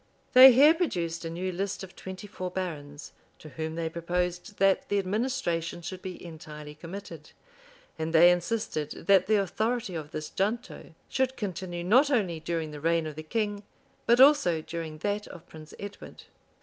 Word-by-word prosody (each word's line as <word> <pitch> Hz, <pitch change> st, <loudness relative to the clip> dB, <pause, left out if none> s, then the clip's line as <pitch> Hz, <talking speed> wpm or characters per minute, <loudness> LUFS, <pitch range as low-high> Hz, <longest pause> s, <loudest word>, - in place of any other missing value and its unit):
They 260 Hz, +1 st, +11 dB
here 285 Hz, +6 st, +7 dB
produced 170 Hz, -, -2 dB
a -, -, -3 dB
new 180 Hz, +3 st, -3 dB
list 195 Hz, +2 st, -3 dB
of 190 Hz, -, -11 dB
twenty 190 Hz, +2 st, -8 dB
four 185 Hz, -3 st, -5 dB
barons, 155 Hz, -6 st, -6 dB, 0.3 s
to 155 Hz, -, -12 dB
whom 160 Hz, +4 st, -5 dB
they 165 Hz, -1 st, -2 dB
proposed 175 Hz, +3 st, -3 dB
that 195 Hz, 0 st, +2 dB
the 205 Hz, -, +1 dB
administration 185 Hz, -5 st, -2 dB
should 185 Hz, +2 st, -6 dB
be 185 Hz, -1 st, -8 dB
entirely 150 Hz, -2 st, -9 dB
committed; 165 Hz, 0 st, -10 dB, 0.7 s
and 160 Hz, +1 st, -2 dB
they 170 Hz, +2 st, +7 dB
insisted 175 Hz, -4 st, -2 dB
that 190 Hz, -2 st, +5 dB
the 215 Hz, -, +4 dB
authority 215 Hz, +2 st, -1 dB
of 155 Hz, -3 st, -5 dB
this 155 Hz, 0 st, -6 dB
junto 210 Hz, -4 st, -3 dB
should 260 Hz, 0 st, -1 dB
continue 180 Hz, -4 st, -4 dB
not 250 Hz, +11 st, +4 dB
only 195 Hz, -, 0 dB
during 160 Hz, -1 st, -3 dB
the 150 Hz, -1 st, -9 dB
reign 165 Hz, 0 st, +1 dB
of 155 Hz, -1 st, -6 dB
the 155 Hz, -, -6 dB
king, 205 Hz, +4 st, -2 dB, 0.5 s
but 235 Hz, +1 st, +5 dB
also 270 Hz, -, +6 dB
during 160 Hz, -1 st, -6 dB
that 205 Hz, +5 st, -2 dB
of 175 Hz, 0 st, -12 dB
Prince 155 Hz, -1 st, -12 dB
Edward. 200 Hz, 0 st, -9 dB
180 Hz, 170 wpm, -28 LUFS, 165-205 Hz, 0.7 s, They